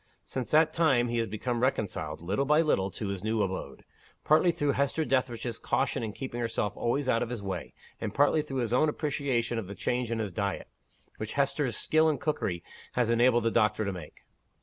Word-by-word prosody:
Since 130 -3 -4
that 155 +1 +4
time, 135 -8 +3
he 120 0 0
has 115 - 0
become 115 +4 -2
reconciled, 95 - -1
little 100 +10 0
by 150 +3 +4
little, 100 -12 +1
to 100 +2 -5
his 100 -1 -4
new 110 -1 +1
abode 95 -1 -5 0.4
partly 160 +3 +5
through 145 -3 0
Hester 140 +3 0
Dethridge's 125 -3 -1
caution - - 0
in 110 -2 -3
keeping 120 +1 -5
herself 115 -3 -1
always 130 +4 0
out 115 -2 +2
of - - -1
his 120 -5 -5
way; 95 -4 -5 0.2
and 110 - -3
partly 145 +5 +3
through 135 -4 -3
his 120 -1 -1
own 155 +5 +4
appreciation 135 -6 -1
of 105 - -6
the 100 - -7
change 125 +2 -1
in 115 - -1
his 105 -3 -2
diet, 100 +1 -3 0.5
which 110 0 -5
Hester's 140 -3 0
skill 155 0 +3
in 150 - 0
cookery 95 - -2 0.3
has 120 -2 +2
enabled 120 0 +4
the 115 - +2
doctor 110 -2 +2
to 100 - -2
make. 85 -5 -10
120 Hz, 205 wpm, -29 LUFS, 105-140 Hz, 0.5 s, partly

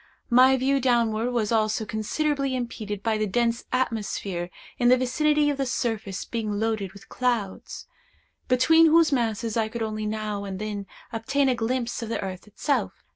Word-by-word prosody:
My 260 +2 +6
view 270 +2 +2
downward 235 -2 +2
was 235 -4 -1
also 215 -1 +1
considerably 275 +6 -1
impeded 215 -5 -4
by 220 -2 +1
the 215 - 0
dense 235 +3 0
atmosphere 205 -7 -2 0.3
in 245 -1 +4
the 255 - +6
vicinity 295 +4 +2
of 285 - -4
the 275 - 0
surface 220 -6 -2
being 220 -3 -3
loaded 215 -4 -1
with 200 - -14
clouds, 235 -6 -2 0.6
between 320 +6 +5
whose 325 0 +5
masses 230 -3 0
I 220 -1 +1
could 230 0 -4
only 215 -1 -3
now 210 -1 -3
and 195 -1 -5
then 205 -1 -4 0.3
obtain 265 +5 +1
a - - +3
glimpse 240 +1 -2
of 230 - -5
the 230 - -2
earth 190 +1 -6
itself. 275 +7 -2
230 Hz, 170 wpm, -25 LUFS, 215-255 Hz, 0.6 s, My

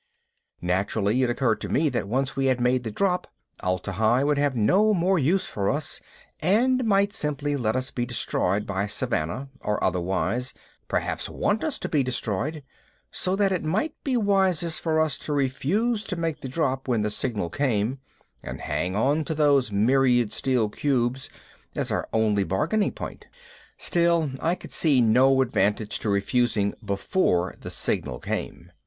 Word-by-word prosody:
Naturally 100 +6 +1
it 125 - +2
occurred 120 -2 +1
to - - -4
me 155 +2 +2
that 100 - -2
once 135 +5 -1
we 135 0 0
had 130 -1 +2
made 125 +1 +2
the 115 - -3
drop, 180 - 0 0.3
Atla 90 +2 -2
Hi 110 +6 +2
would 145 0 +2
have 145 -2 +1
no 195 - +3
more 180 +1 +2
use 170 +7 +2
for 100 -1 -2
us 150 +2 -2 0.4
and 245 +9 +3
might 200 -1 +3
simply 145 -1 -2
let 115 -5 0
us 130 +1 -2
be 120 -1 -2
destroyed 100 +3 -1
by 100 0 -2
Savannah 115 - -2
or 105 0 -2
otherwise 95 +7 -1 0.3
perhaps - - -2
want 210 +1 0
us 310 - -1
to - - -4
be 150 - +2
destroyed 130 +4 -2 0.5
so 185 +1 0
that 200 -1 +2
it 185 - -1
might 205 - 0
be 260 -3 +1
wisest 190 -6 +2
for 160 -1 +1
us 155 -3 +1
to 150 - -4
refuse 185 - 0
to 185 - -3
make 165 -3 -2
the 130 - -5
drop 135 -2 -1
when 115 -4 +1
the 105 - -1
signal 105 -6 -2
came 125 -2 0 0.4
and - - -7
hang 85 +6 -2
onto 145 +7 +1
those 140 -6 +3
myriad 120 +1 +3
steel 125 -5 +1
cubes 130 +2 -1 0.5
as - - -2
our - - -2
only 105 -2 +2
bargaining 150 - 0
point. - - -8 0.5
Still, 170 -4 +1
I 170 +2 +1
could - - -12
see 145 -5 +3
no 130 +4 +5
advantage 105 -3 0
to 110 - -2
refusing 100 0 +1
before 100 - 0
the - - -7
signal 60 - -2
came. - - -5
130 Hz, 165 wpm, -25 LUFS, 105-160 Hz, 0.5 s, no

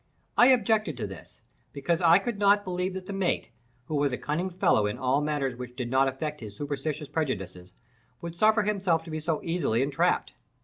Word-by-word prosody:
I 245 - +7
objected 220 - +3
to 110 - -3
this, 95 -4 -11 0.3
because 165 +5 -1
I 170 0 +7
could 210 0 -3
not 205 0 +4
believe 185 0 -2
that 190 -1 -6
the 200 - -6
mate 195 -2 -1 0.3
(who 155 - -4
was 145 -1 +2
a 125 - -2
cunning 170 +6 -2
fellow 170 - +2
in 105 - -3
all 130 +2 +1
matters 145 -4 -1
which 125 0 -8
did 120 -1 -4
not 135 +1 +4
affect 150 +2 -4
his 105 -2 -9
superstitious 145 +1 -3
prejudices) 95 - -4 0.5
would 170 -1 -6
suffer 215 +4 +4
himself 190 -6 +1
to 165 - -10
be 155 - -3
so 155 0 -1
easily 165 -9 0
entrapped. 140 0 0
155 Hz, 195 wpm, -27 LUFS, 130-185 Hz, 0.5 s, I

